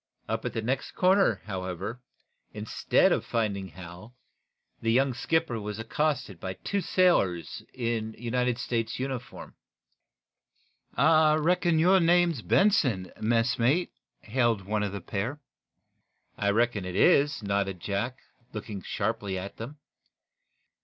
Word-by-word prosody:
Up - - -3
at - - -3
the 115 - -3
next 130 +4 -2
corner, 190 +2 +3
however, 95 +4 -5 0.5
instead 105 0 +2
of - - +1
finding 100 -4 -2
Hal, 90 +6 -12 0.7
the 115 - +1
young 130 +2 +3
skipper 135 -2 -1
was 105 0 -5
accosted 125 - -2
by 95 +2 -4
two 200 - -3
sailors 160 - +1
in 115 -3 -3
United 125 +1 -1
States 115 -2 -2
naval 135 +1 -2
uniform. 125 - -12 1.4
"I 155 -1 +5
reckon 170 +1 +2
your 185 +4 +5
name's 170 -5 +3
Benson, 130 - +2
messmate?" 120 +8 +2 0.3
hailed 115 -4 0
one 105 +1 -1
of 105 -2 -1
the 100 -1 -6
pair. 115 - -3 1.0
"I 100 - 0
reckon 110 -1 +1
it 90 0 -5
is," 145 - +3
nodded 100 -2 -1
Jack, 105 +8 -3 0.4
looking 105 -2 -6
sharply 100 -1 -2
at 95 +2 -7
them. 130 +7 -8
115 Hz, 125 wpm, -28 LUFS, 100-145 Hz, 1.4 s, I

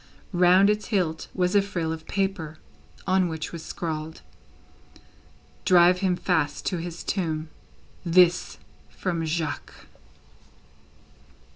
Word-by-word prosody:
Round 180 +2 +5
its 210 0 -3
hilt 175 -7 -1
was 180 0 +1
a 200 - +6
frill 170 -5 -2
of 160 -1 -9
paper, 190 -6 -2 0.5
on 185 -1 +3
which 160 -1 -5
was 170 -2 -7
scrawled: 160 -1 -5 1.4
"Drive 180 -1 +5
him 185 -2 +1
fast 160 -5 -1
to 180 - -1
his 170 0 -6
tomb. 160 -5 -2 0.5
This, 180 0 +3 0.3
from 170 -3 -3
Jacques." 155 -2 -4
175 Hz, 110 wpm, -25 LUFS, 160-185 Hz, 1.4 s, a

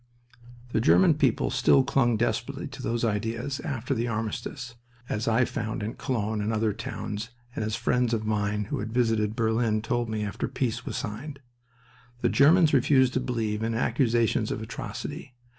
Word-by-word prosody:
The 110 - +1
German 175 +7 +5
people 140 -6 +1
still 130 +1 +4
clung 125 -4 +2
desperately 120 +2 -1
to - - -9
those 120 0 -1
ideas 115 +6 -2
after 130 -4 -3
the 120 -1 -1
armistice, 115 +3 -4 0.3
as 105 - -2
I 115 +2 +3
found 110 -3 -3
in 110 - -3
Cologne 110 -4 -2
and 105 +2 -1
other 110 -1 +1
towns, 105 +3 -5 0.3
and - - -2
as 110 0 -1
friends 125 0 +1
of 110 -2 -1
mine 105 -1 0
who - - -1
had 110 +2 -4
visited 115 -3 +1
Berlin 110 -1 +1
told 120 0 -1
me 110 -1 -2
after 105 - -3
peace 115 -3 -2
was - - -3
signed. 135 +7 -5 0.8
The - - +3
Germans 155 +3 +5
refused 130 -1 +4
to - - +1
believe 115 -4 -2
in 115 0 -1
accusations 115 -2 +1
of - - -2
atrocity. 120 +5 -6
115 Hz, 170 wpm, -27 LUFS, 110-125 Hz, 0.8 s, German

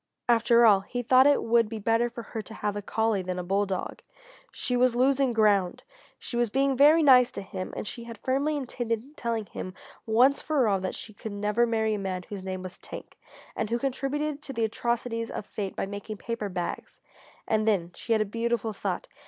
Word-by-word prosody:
After 235 0 +5
all, 205 -3 +7
he 245 +5 -5
thought 255 +3 +6
it 290 - +3
would 230 -1 +3
be 225 - -5
better 225 +3 +1
for 235 0 -8
her 220 - -5
to 220 +1 -11
have 210 -1 -2
a 205 - -3
collie 220 -1 0
than 185 0 -4
a 180 - -3
bulldog. 195 0 -2 0.5
She 250 - -2
was 245 -1 +3
losing 265 +1 +3
ground! 205 -5 +2 0.3
She - - -7
was 240 -1 +1
being 270 +3 +1
very 300 +5 +6
nice 250 -3 +7
to - - -5
him, 185 -1 -6
and - - -4
she 235 +2 -7
had 230 -1 -9
firmly 280 +6 0
intended 245 0 -4
telling 230 -5 -2
him 185 -1 -7 0.3
once 250 +6 +4
for 290 -7 +1
all 195 -2 +2
that 185 0 -3
she 215 - -8
could 210 +1 -7
never 210 +4 +1
marry 220 -1 +1
a 210 - -2
man 185 -2 -3
whose 195 +1 -8
name 185 -1 -5
was 185 -1 -8
Tank, - - -10 0.4
and 215 - -2
who 235 - +1
contributed 275 +3 -2
to 275 - -7
the 230 -2 +1
atrocities 230 0 -2
of - - -5
fate 200 -3 -5
by - - -2
making 205 +2 -7
paper 230 -1 -4
bags. 180 -2 -5 0.5
And 215 0 +1
then 180 -5 +1
she 230 - -2
had 220 - +2
a - - -8
beautiful 230 +1 -1
thought. - - -3
225 Hz, 210 wpm, -27 LUFS, 205-245 Hz, 0.5 s, all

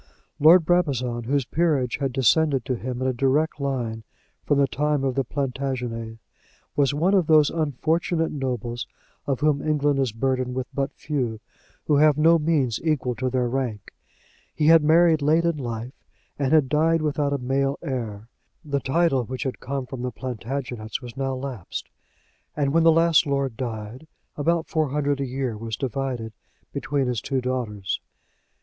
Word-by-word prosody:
Lord 165 +3 +7
Brabazon, 130 -9 +1
whose 135 +1 +1
peerage 145 -6 +1
had 135 -2 -1
descended 135 +2 +2
to 130 - -1
him 125 +2 -4
in - - +1
a 130 - +1
direct 140 +5 +1
line 120 -5 -2 0.4
from 145 - +3
the 140 - +5
time 150 +1 0
of 135 -1 0
the 135 +1 0
Plantagenets, 125 -4 -3 0.6
was 140 -1 +3
one 165 +7 +1
of 185 -5 +3
those 155 -2 +5
unfortunate 160 +2 0
nobles 125 -3 -3 0.4
of 135 -1 -1
whom 150 -2 +2
England 145 -2 +1
is 130 -4 +1
burdened 130 +2 -1
with 130 -1 -2
but 140 0 -1
few, 125 -8 -2 0.5
who 150 - +3
have 150 0 +5
no 165 +2 +5
means 150 -7 +1
equal 150 -6 0
to 130 +2 -2
their 125 -1 0
rank. 120 -5 -3 0.6
He 150 - 0
had 165 0 +7
married 160 0 +5
late 160 +4 +3
in 170 -2 +1
life, 120 -1 -5 0.5
and 140 -1 0
had 155 -4 +5
died 160 +3 +2
without 145 -1 0
a 140 - +1
male 135 +2 0
heir. 115 -7 -4 0.4
The 140 -1 -1
title 135 -2 +1
which 130 +3 -4
had 130 - -4
come 135 0 -4
from 125 -1 -7
the 125 - -2
Plantagenets 125 -1 -5
was 120 0 -9
now 135 -1 -2
lapsed; 130 -8 -6 0.7
and 140 -1 +1
when 165 - +4
the 165 0 +6
last 165 -1 +4
lord 140 -3 -1
died, 115 +3 -6 0.3
about 165 +3 +1
four 155 -5 0
hundred 145 0 0
a 135 - -1
year 130 -2 -3
was 110 0 -5
divided 125 -3 -3 0.4
between 140 0 -1
his 125 -4 -1
two 135 - -1
daughters. 120 -6 -3
135 Hz, 170 wpm, -24 LUFS, 125-150 Hz, 0.7 s, Lord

